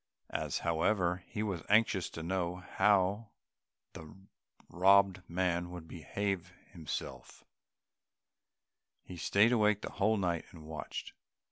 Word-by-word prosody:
As, - - -2
however, 90 +2 +1
he 105 - -3
was 95 -6 -2
anxious 105 -3 +3
to 80 - -7
know 90 0 -1
how 100 +3 +1 0.6
the 80 -1 -10 0.6
robbed 95 +1 +4
man 90 0 0
would 90 -2 -9
behave 90 +2 -3 0.2
himself, 80 -5 -7 1.6
he 90 - -9
stayed 100 +6 +3
awake 105 -3 +3
the - - -5
whole 110 +2 +1
night 85 -4 -1
and 80 -3 -13
watched. 75 -2 -6
90 Hz, 115 wpm, -32 LUFS, 85-100 Hz, 1.6 s, robbed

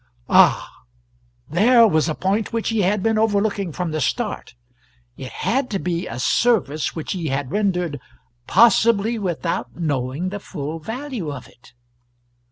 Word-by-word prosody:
Ah - - +5 0.8
there 230 - +5
was 160 -4 +1
a 155 - -2
point 200 +3 -1
which 230 -2 -1
he 225 -2 +1
had 190 +1 +1
been 225 -1 +2
overlooking 205 -3 0
from 175 +2 -3
the 155 0 -2
start: 210 - -3 0.6
it 130 -1 -8
had 255 +2 -1
to 200 - -1
be 175 -2 -3
a 115 - -6
service 155 - +1
which 160 - -5
he 175 -4 -3
had 135 -1 -2
rendered 180 -8 -1 0.5
"possibly 230 -1 +4
without 175 -3 -3
knowing 145 +1 -2
the 205 +2 -5
full 160 -4 -6
value 225 - -5
of 140 -3 -8
it." 120 - -21
185 Hz, 150 wpm, -21 LUFS, 155-220 Hz, 0.8 s, Ah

